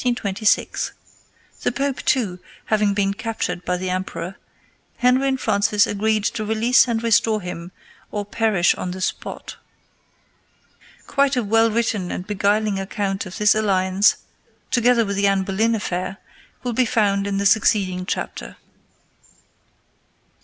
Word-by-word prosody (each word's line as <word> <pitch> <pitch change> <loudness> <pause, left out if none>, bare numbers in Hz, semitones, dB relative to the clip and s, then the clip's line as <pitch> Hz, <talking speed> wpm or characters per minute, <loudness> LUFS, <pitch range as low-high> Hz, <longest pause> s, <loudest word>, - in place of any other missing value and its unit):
The 215 -3 -2
Pope, 275 +2 -2
too, 205 -9 0 0.3
having 210 -2 +1
been 195 -1 +1
captured 205 -5 -4
by 180 - -1
the 185 0 -3
emperor, 185 -1 -4 0.6
Henry 255 +2 +3
and 265 -1 0
Francis 205 -2 +2
agreed 215 +1 0
to 215 +1 -1
release 220 +4 +3
and 230 -1 -1
restore 225 -1 +3
him 180 -2 -7 0.4
or 205 -1 -3
perish 205 -4 +2
on 180 - -5
the 185 +1 -6
spot. 185 - -4 1.5
Quite 280 -1 +1
a 250 - 0
well 225 +2 +3
written 215 -5 -1
and 180 - -5
beguiling 205 0 0
account 195 0 -3
of 185 - -8
this 210 -1 +4
alliance, 195 -1 +2 0.6
together 240 -1 +3
with 200 -1 -3
the 200 0 +3
Anne 195 -1 +2
Boleyn 220 +4 +1
affair, 185 -2 -3 0.5
will 245 -1 -2
be 250 +2 +2
found 205 -4 +1
in 200 -1 -1
the 200 - -1
succeeding 190 -3 +2
chapter. - - -4
205 Hz, 135 wpm, -21 LUFS, 195-225 Hz, 1.5 s, this